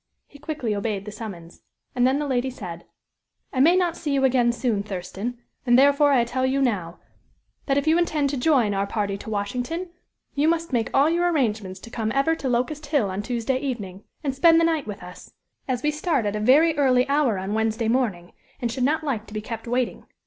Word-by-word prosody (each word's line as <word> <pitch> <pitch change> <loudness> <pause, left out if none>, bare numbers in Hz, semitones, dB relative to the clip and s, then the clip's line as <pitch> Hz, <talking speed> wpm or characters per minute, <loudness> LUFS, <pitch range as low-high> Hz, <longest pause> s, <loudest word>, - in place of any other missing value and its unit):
He 285 - -16
quickly 295 -7 -3
obeyed 200 -1 -3
the 210 - -6
summons. 195 -6 -9 0.3
And 250 0 +3
then, 265 +2 +2
the 295 - -2
lady 260 -2 0
said: 175 -9 -8 0.7
"I 260 - -1
may 325 +7 +6
not 355 -2 +1
see 295 -5 -2
you 270 - +1
again 245 -2 +3
soon, 235 -4 -1
Thurston, 200 +4 -5 0.3
and, 245 -1 +4
therefore, 285 +2 +5
I 255 -4 +4
tell 250 +2 -2
you 260 +1 +1
now 190 -10 -1 0.7
that 275 -1 +2
if 280 - +1
you 320 +2 +4
intend 305 -5 +1
to - - -2
join 250 -6 +2
our 195 0 -1
party 200 -1 -2
to 220 - -8
Washington, 245 - -3 0.4
you 290 +2 +1
must 330 -2 0
make 230 -2 +1
all 275 +2 +4
your 345 +2 +2
arrangements 215 - -1
to 230 - -11
come 220 -2 -2
ever 275 +4 +3
to 270 - -3
Locust 280 +5 -1
Hill 275 -10 +1
on 190 +2 -3
Tuesday 245 +3 -1
evening, 210 -8 -5 0.2
and 275 -3 -1
spend 330 +4 +5
the - - +3
night 320 -6 0
with 205 -3 -7
us; 180 0 -12 0.3
as 255 -2 -2
we 300 - +2
start 300 - 0
at 205 0 -1
a - - -2
very 295 +9 +4
early 255 -2 +3
hour 280 -7 +2
on 190 +2 -3
Wednesday 220 +1 0
morning, 220 -8 0 0.3
and 240 -3 -2
should 255 +1 -2
not 310 +4 +1
like 235 -7 -3
to 210 - -11
be - - -1
kept 230 +1 -7
waiting. 245 +1 -2
250 Hz, 220 wpm, -24 LUFS, 215-285 Hz, 0.7 s, may